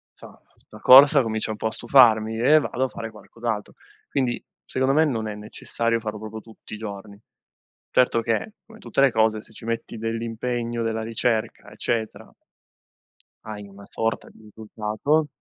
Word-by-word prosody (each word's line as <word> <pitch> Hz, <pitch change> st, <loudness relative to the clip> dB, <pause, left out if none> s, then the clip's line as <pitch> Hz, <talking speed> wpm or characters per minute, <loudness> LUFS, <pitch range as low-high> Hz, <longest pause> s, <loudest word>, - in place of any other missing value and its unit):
insomma -, -, -15 dB
sta -, -, -15 dB
corsa 140 Hz, +2 st, +8 dB
comincia 110 Hz, -2 st, -2 dB
un 110 Hz, -, -5 dB
po' 110 Hz, -, -1 dB
a -, -, -3 dB
stufarmi." 110 Hz, -3 st, +4 dB
E 145 Hz, +6 st, +5 dB
vado 130 Hz, -3 st, -1 dB
a -, -, -1 dB
fare 115 Hz, -3 st, -7 dB
qualcos'altro. 110 Hz, 0 st, -5 dB, 0.4 s
Quindi 125 Hz, -3 st, -1 dB, 0.2 s
secondo 130 Hz, +1 st, 0 dB
me 160 Hz, +1 st, +5 dB
non 115 Hz, -7 st, -2 dB
è 105 Hz, -, -5 dB
necessario 115 Hz, +2 st, -2 dB
farlo 110 Hz, -1 st, -5 dB
proprio 110 Hz, +1 st, -8 dB
tutti 110 Hz, -1 st, -14 dB
i -, -, -4 dB
giorni. 100 Hz, -1 st, -8 dB, 0.8 s
Certo 125 Hz, -2 st, +3 dB
che, 115 Hz, -, -1 dB, 0.2 s
come 225 Hz, 0 st, -15 dB
tutte -, -, -1 dB
le 140 Hz, -1 st, +5 dB
cose, 110 Hz, -1 st, +2 dB
se -, -, -17 dB
ci 110 Hz, -, -10 dB
metti 115 Hz, 0 st, -4 dB
dell'impegno, 115 Hz, +1 st, -3 dB
della 110 Hz, 0 st, -2 dB
ricerca, 115 Hz, 0 st, -1 dB
eccetera, 115 Hz, -2 st, -3 dB, 1.1 s
hai 105 Hz, -2 st, -8 dB
una 100 Hz, 0 st, -14 dB
sorta 115 Hz, 0 st, -2 dB
di -, -, -20 dB
risultato 110 Hz, +7 st, -2 dB
115 Hz, 165 wpm, -24 LUFS, 110-120 Hz, 1.1 s, corsa